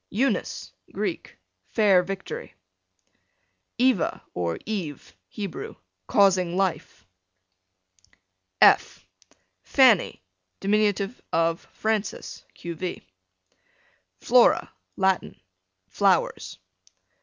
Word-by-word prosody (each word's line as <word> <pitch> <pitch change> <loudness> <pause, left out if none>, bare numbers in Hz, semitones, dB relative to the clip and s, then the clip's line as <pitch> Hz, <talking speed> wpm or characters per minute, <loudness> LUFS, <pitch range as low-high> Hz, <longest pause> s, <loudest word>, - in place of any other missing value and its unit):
Eunice, 260 +7 -1 0.2
Greek, - - -4 0.3
fair 200 -5 +4
victory. 190 - -7 1.2
Eva, 250 -8 +1
or 85 -2 -2
Eve, 180 -10 -5
Hebrew, 200 -5 -6 0.3
causing 185 -3 +3
life. 185 - -2 1.5
F - - +4 0.6
Fanny, 245 - +3 0.4
dim. 205 0 +1 0.2
of 165 0 +1
Frances, 220 -1 -3
q.v. 170 +1 -6 1.2
Flora, - - +4 0.2
Latin, 190 -1 0 0.5
flowers. 95 - 0
190 Hz, 65 wpm, -25 LUFS, 170-210 Hz, 1.5 s, fair